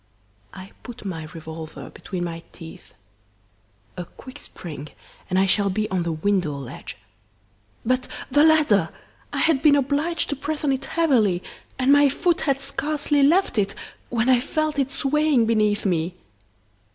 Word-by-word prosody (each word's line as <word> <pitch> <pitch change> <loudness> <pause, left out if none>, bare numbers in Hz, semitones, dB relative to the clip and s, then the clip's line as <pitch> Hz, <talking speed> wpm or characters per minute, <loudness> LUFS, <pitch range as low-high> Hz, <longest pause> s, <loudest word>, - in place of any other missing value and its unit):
I 190 0 -11
put 240 -4 -10
my 165 -5 -4
revolver 160 0 -9
between 185 -3 -5
my 165 -1 -5
teeth. 165 -2 -12 1.0
A 180 - -5
quick 260 +10 -13
spring, 150 -4 -8 0.4
and 185 - +1
I 190 - +4
shall 200 +1 +2
be 215 +3 -1
on 185 -2 +1
the 170 0 -1
window 160 -2 0
ledge. 135 -3 -8 0.9
But 255 +2 +1 0.2
the 290 +3 +5
ladder! 315 -1 +4 0.4
I - - -4
had 315 -5 +3
been 295 -2 +6
obliged 290 +5 0
to - - 0
press 300 +3 -4
on 285 - +2
it 265 - -1
heavily, 230 - +2 0.3
and 260 +1 +3
my 285 0 +6
foot 340 +5 +1
had 275 -2 +1
scarcely 290 +1 0
left 300 - +3
it, 195 -1 0 0.3
when 235 0 0
I 255 -2 +5
felt 310 +3 -1
it 270 -1 +1
swaying 290 -3 +2
beneath 215 -2 +1
me. 175 -1 0
245 Hz, 155 wpm, -23 LUFS, 185-290 Hz, 1.0 s, been